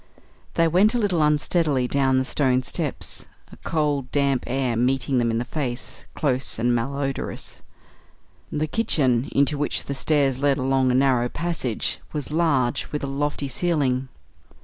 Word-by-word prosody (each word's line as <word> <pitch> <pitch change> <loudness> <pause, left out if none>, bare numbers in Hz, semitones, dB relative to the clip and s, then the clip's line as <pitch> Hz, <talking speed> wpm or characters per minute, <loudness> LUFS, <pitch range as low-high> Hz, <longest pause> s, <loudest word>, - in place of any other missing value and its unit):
They 165 - +4
went 195 +8 +3
a - - +3
little 200 -8 +1
unsteadily 150 -3 +2
down 135 0 +2
the 130 - +1
stone 130 -2 +1
steps, - - -3 0.2
a - - -13
cold, 145 -5 -1
damp 140 -3 +1
air 130 -2 0
meeting 130 +2 +1
them 120 -1 +1
in 115 - 0
the 120 - -2
face, 125 -2 -5
close 130 -3 0
and 120 +2 +1
mal 120 +4 -1
odorous. 135 -1 -4 0.9
The 150 +1 0
kitchen, 140 - +1
into 140 +1 +2
which 145 - -1
the 140 - -3
stairs 140 -2 +1
led 140 -1 +2
along 130 -1 +2
a 125 - +2
narrow 130 -2 +3
passage, 165 -10 -2
was 150 -1 -4
large, 145 -7 +1
with 150 - -3
a - - -1
lofty 140 +1 -2
ceiling. 135 -3 0
135 Hz, 160 wpm, -23 LUFS, 130-150 Hz, 0.9 s, They